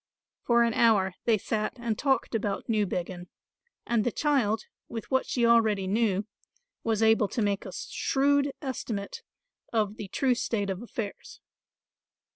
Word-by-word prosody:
For 235 -1 +4
an 230 -1 +1
hour 205 -6 +3
they 230 -2 +4
sat 215 +2 -2
and 235 -2 -2
talked 270 +2 0
about 205 -3 -2
Newbiggin; 185 -5 -1 0.6
and 235 -2 +1
the 245 - 0
child, 240 -8 +1 0.3
with 225 +2 -6
what 260 0 +2
she 240 -2 +1
already 220 -4 +4
knew, 200 0 +1 0.6
was 225 -1 +1
able 220 -1 +4
to 235 - -4
make 200 -1 -1
a - - -7
shrewd 280 +1 +1
estimate 225 -6 -4 0.5
of 215 -2 0
the 205 - -6
true 255 +6 +1
state 205 -4 -1
of 190 +2 -5
affairs. 225 -3 -6
225 Hz, 145 wpm, -28 LUFS, 205-235 Hz, 0.6 s, For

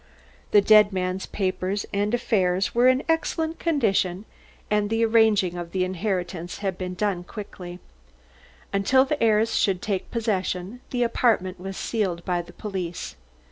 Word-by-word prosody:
The 205 - +6
dead 210 0 +6
man's 185 0 -2
papers 190 +1 -2
and 205 +1 0
affairs 190 -6 +1
were 240 +2 +4
in 255 +1 +3
excellent 325 0 -1
condition 205 - +1 0.5
and 210 -1 +2
the 225 +1 +2
arranging 220 -5 +3
of 170 -1 -6
the 185 -1 +1
inheritance 185 -2 -3
had 195 -2 -2
been 180 0 -5 0.3
quickly 190 -4 -8
done. 180 - -11 1.0
Until 260 +6 +4
the 290 +2 -2
heirs 225 0 +3
should 190 -3 +2
take 195 -1 -3
possession, 205 -1 -2
the 245 -1 0
apartment 220 -6 +1
was 190 +1 -6
sealed 185 -7 -2
by 175 -1 0
the 175 - -13
police. 185 -5 -5
200 Hz, 145 wpm, -25 LUFS, 185-225 Hz, 1.0 s, The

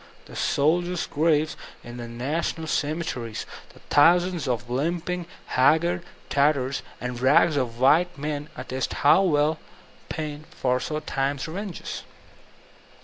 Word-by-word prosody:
The - - -12
soldiers' 175 +4 +1
graves 155 0 +1 0.3
in 120 0 -9
the 120 -1 -6
National 145 +7 -2
cemeteries, 145 -7 -2 0.3
the - - -19
thousands 175 +1 +4
of 120 -1 -1
limping, 170 +7 -2 0.2
haggard 165 +7 +3 0.3
tatters 140 -2 +2 0.2
and 125 -1 -4
rags 150 +5 +4
of 120 -4 -2
white 160 +7 +4
men 150 +1 -4
attest 130 0 -3
how 150 - +7
well 155 -3 +2 0.5
Paine 155 -1 -5
foresaw 130 +4 -1
Time's 140 0 -2
revenges. 190 +2 -5
150 Hz, 115 wpm, -25 LUFS, 130-165 Hz, 0.5 s, how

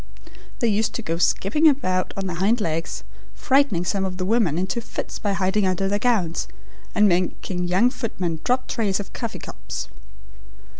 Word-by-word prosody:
They 235 - +3
used 215 0 +1
to 235 - -3
go 165 -2 -2
skipping 235 - +3
about 185 -11 +2
on 195 - -2
their 180 -3 -3
hind 210 +6 +2
legs, 165 -4 -2 0.3
frightening 265 -11 +2
some 195 +1 0
of 185 -1 -3
the 185 - -2
women 200 -7 +2
into 190 +6 -1
fits - - -5
by 205 -2 0
hiding 195 +1 +1
under 185 +1 0
their 205 +1 0
gowns, 205 -9 +1 0.5
and 210 -1 +6
making 180 0 0
young 195 +8 +3
footmen 180 - -3
drop 255 +1 +1
trays 210 -5 0
of 200 - -7
coffee 230 -3 -4
cups. - - -7
195 Hz, 170 wpm, -23 LUFS, 180-230 Hz, 0.5 s, and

